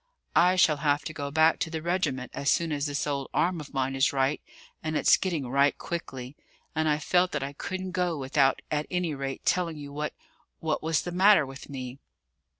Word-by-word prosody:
I 180 +2 +5
shall 160 -5 +4
have 145 0 +1
to 155 - -5
go 140 -2 -4
back 160 +2 +4
to - - -1
the 160 0 -3
regiment 170 -8 -1
as 140 - -1
soon 170 -2 +2
as 145 0 -1
this 145 0 -2
old 140 -2 -2
arm 175 -1 +1
of 150 - -11
mine 135 -1 -1
is 135 +1 +3
right; 135 +1 0 0.4
and 155 -1 -1
it's - - +6
getting 165 -8 -2
right 140 +3 +3
quickly; 135 -6 -6 0.4
and 160 0 +1
I 150 - +3
felt 180 +4 +2
that - - -1
I 140 +1 -5
couldn't 185 +5 -5
go 180 -2 0
without 135 0 +2
at 150 0 -1
any 180 -3 -1
rate 135 -1 -5
telling 170 -3 +1
you 145 -1 -8
what 150 +1 -3 0.4
what 155 -1 -1
was 160 -1 0
the 175 - -4
matter 190 -2 +5
with 135 +2 -10
me." 130 -1 -6
150 Hz, 210 wpm, -28 LUFS, 140-170 Hz, 0.4 s, it's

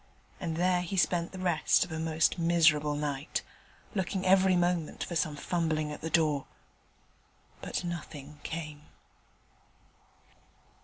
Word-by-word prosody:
And 165 -4 -3
there 180 +1 +2
he 180 +2 -4
spent 175 -1 +2
the 190 - -8
rest 180 -1 +2
of 180 - -13
a 160 - -3
most 160 +2 +1
miserable 160 -3 +4
night, 145 -1 -2 0.5
looking 190 -1 -2
every 190 0 +5
moment 175 -2 0
for 170 - -5
some 155 -2 0
fumbling 155 -1 -1
at 150 - -7
the 160 - -3
door: 155 -4 +2 1.1
but - - -3
nothing 150 -4 -7
came. 155 -2 -6
165 Hz, 125 wpm, -30 LUFS, 150-175 Hz, 1.1 s, every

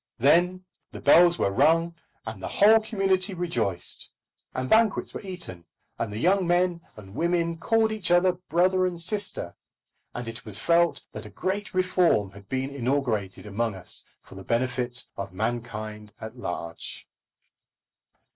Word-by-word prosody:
Then 175 +8 +3 0.3
the - - -8
bells 170 +5 +6
were 100 - +1
rung, 165 +8 +3 0.3
and 110 -3 -7
the - - -4
whole 220 +2 +6
community 195 -3 +1
rejoiced, 115 - -1 0.4
and 130 0 -2
banquets 220 - +2
were - - -6
eaten, 175 - -5 0.3
and 115 -2 -2
the 105 - -5
young 185 - +2
men 175 0 +2 0.2
and 95 -2 -12
women 170 +2 0
called 225 +5 +2
each 210 -5 0
other 175 +1 +5
brother 180 +1 +1
and 175 -2 -5
sister, 200 +4 0 0.6
and 120 -1 -5
it 115 +1 -7
was 105 -2 -5
felt 170 +6 +2
that - - -8
a - - -11
great 195 +1 -3
reform 180 - +2
had 100 0 -15
been 130 +1 -2
inaugurated 125 -8 -2
among 105 +1 -2
us 95 - -2 0.2
for - - -15
the 95 0 -9
benefit 125 +2 -1
of 100 -2 -6
mankind 110 -1 -4
at 110 +2 -8
large. 90 -8 -6
155 Hz, 150 wpm, -26 LUFS, 110-180 Hz, 0.6 s, bells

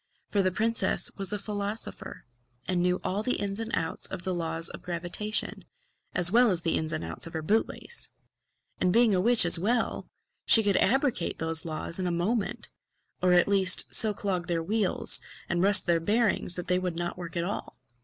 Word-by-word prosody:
For 200 - +2
the 185 - +2
princess 225 +4 0
was 195 -1 0
a 210 - 0
philosopher, 205 +1 -6 0.4
and 180 -1 +1
knew 180 +1 +1
all 195 +3 -1
the 250 +3 +1
ins 200 0 -2
and 225 0 -4
outs 160 - -2
of 185 -2 -7
the 185 - -2
laws 165 -1 -2
of - - -9
gravitation 180 +5 -3 0.5
as 175 0 +3
well 240 +2 +5
as 180 -4 0
the 165 - 0
ins 155 0 -2
and 155 - -3
outs 80 - -3
of 165 - -11
her 160 -1 -4
boot 215 +8 +1
lace. 475 - -3 0.7
And 180 - +2
being 230 +1 +4
a 180 - +2
witch 235 0 +5
as 170 - +6
well, 230 +6 -1 0.4
she 225 - +7
could 200 -2 +2
abrogate 260 - +1
those 160 +1 0
laws 165 +2 -4
in 185 - -1
a - - -1
moment; 195 +6 -1 0.5
or 180 -1 +3
at 175 -1 +4
least 190 -2 +3
so 220 - +6
clog 190 -4 -3
their 170 -2 -1
wheels 205 +1 +2 0.3
and 175 0 -1
rust 200 +1 +4
their 170 -1 +2
bearings 210 0 0
that 180 - -5
they 180 0 +1
would 180 -2 -4
not 175 0 -3
work 170 -1 -6
at 170 - -1
all. 200 +4 -6
185 Hz, 205 wpm, -27 LUFS, 175-210 Hz, 0.7 s, she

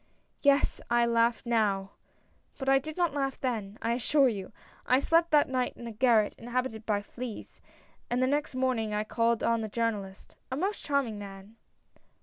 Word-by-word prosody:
"Yes 280 0 +3
— - - -35
I 240 0 +4
laugh 235 0 +2
now, 205 -4 +1 0.7
but 270 - -6
I 270 0 +5
did 310 +4 -7
not 345 -5 +1
laugh 275 -2 -2
then, 220 -5 -3
I 230 - +1
assure 270 +3 +3
you! 195 -5 -5 0.3
I 255 - +3
slept 330 +4 +3
that 300 -2 +4
night 255 -1 -1
in 235 - -9
a 230 - -5
garret 220 -2 +3
inhabited 240 -2 -3
by 205 -2 0
fleas; 240 +1 -8 0.5
and 245 - 0
the 255 - +3
next 290 0 -1
morning 245 -5 0
I 210 - 0
called 230 +1 0
on 230 -1 +2
the 220 - -4
Jour 230 +1 +1
nalist 195 -2 -9
— - - -44
a 260 - -2
most 390 +6 -2
charming 270 -8 0
man." 200 +1 -10
235 Hz, 190 wpm, -29 LUFS, 215-270 Hz, 0.7 s, I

